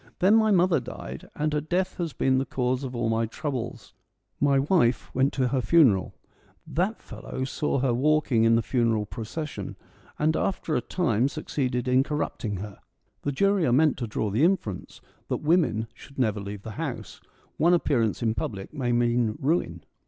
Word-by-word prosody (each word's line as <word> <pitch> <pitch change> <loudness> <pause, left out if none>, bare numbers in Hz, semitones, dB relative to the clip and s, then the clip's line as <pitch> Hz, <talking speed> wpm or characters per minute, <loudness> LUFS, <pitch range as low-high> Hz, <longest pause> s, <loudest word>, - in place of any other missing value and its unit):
Then 190 +3 +4
my 220 -1 +4
mother 180 -5 +4
died, 125 0 -8
and 150 0 -1
her 150 - +1
death 180 +4 -1
has 170 -3 -2
been 130 -1 +1
the - - +1
cause 130 +1 -1
of 130 -2 -5
all 120 -1 0
my 115 0 +1
troubles. 135 -1 -5 0.5
My 140 -1 +3
wife 135 -4 +2
went 135 +2 +2
to 130 -2 +1
her 130 0 0
funeral; 125 - +4 0.5
that 190 +7 -1
fellow 130 - -6
saw 140 +2 -1
her 130 -2 +2
walking 135 -3 +2
in 115 0 +5
the 115 - +2
funeral 115 -3 +1
procession, 135 +9 -6 0.4
and 155 +1 +2
after 170 -4 -1
a 125 - +1
time 125 - +1
succeeded 130 -4 -2
in 125 +1 +4
corrupting 135 -8 -3
her. 100 +1 -8 0.4
(The 145 - -1
jury 195 +5 +2
are - - +2
meant 150 +5 +4
to 120 - -3
draw 105 -1 -2
the 115 +9 +2
inference 165 - -1 0.3
that - - -1
women 150 - +2
should 140 - -15
never 110 -5 +1
leave 100 0 -7
the 110 - -6
house: - - -5 0.4
one 170 +3 +4
appearance 120 -9 0
in 110 -1 +2
public 100 -1 -5
may 130 -5 -1
mean 120 -2 +1
ruin.) 130 - -1
130 Hz, 180 wpm, -26 LUFS, 115-155 Hz, 0.5 s, in